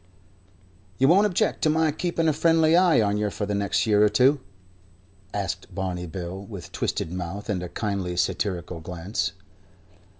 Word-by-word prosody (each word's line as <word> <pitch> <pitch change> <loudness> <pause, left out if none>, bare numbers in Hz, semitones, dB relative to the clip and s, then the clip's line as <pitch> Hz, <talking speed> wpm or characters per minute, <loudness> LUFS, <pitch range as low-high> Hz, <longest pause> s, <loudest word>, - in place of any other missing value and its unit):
"You 135 - +4
won't 195 +7 +5
object 185 - 0
to 155 - +3
my 160 0 +2
keeping 165 +1 -1
a 155 - +3
friendly 165 +1 +4
eye 175 -7 +5
on 100 0 +1
yer 105 0 0
for 105 - -4
the 105 - -2
next 100 -1 0
year 105 -1 +4
or 105 - +5
two?" 130 +7 +4 0.9
asked 100 -2 -4
Barney 90 -2 -3
Bill, 90 +2 -6
with 100 -4 -9
twisted 80 - -2
mouth 90 +4 -5
and 90 -3 -2
a 90 - -5
kindly, 95 -3 -3
satirical 90 -1 -1
glance. 90 +5 -3
105 Hz, 165 wpm, -25 LUFS, 90-150 Hz, 0.9 s, won't